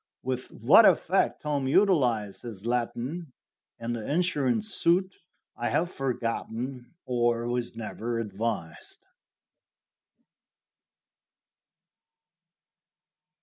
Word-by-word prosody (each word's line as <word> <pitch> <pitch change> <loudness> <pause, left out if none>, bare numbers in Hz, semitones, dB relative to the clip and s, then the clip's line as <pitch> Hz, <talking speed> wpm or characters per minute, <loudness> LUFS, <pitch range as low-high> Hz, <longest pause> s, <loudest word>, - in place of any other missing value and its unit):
With 130 0 -3
what - - +6
effect - - +2
Tom 145 -3 -1
utilized 125 - +2
his 110 -4 -9
Latin 125 +6 -2 0.4
in 115 +1 -3
the 115 +2 -4
insurance 175 - +1
suit 185 +3 +2 0.4
I - - -2
have 175 +2 0
forgotten, 125 0 -4
or 120 -1 +1
was 120 -1 -2
never 115 +1 -4
advised. 105 -6 -5
120 Hz, 80 wpm, -28 LUFS, 115-145 Hz, 0.4 s, what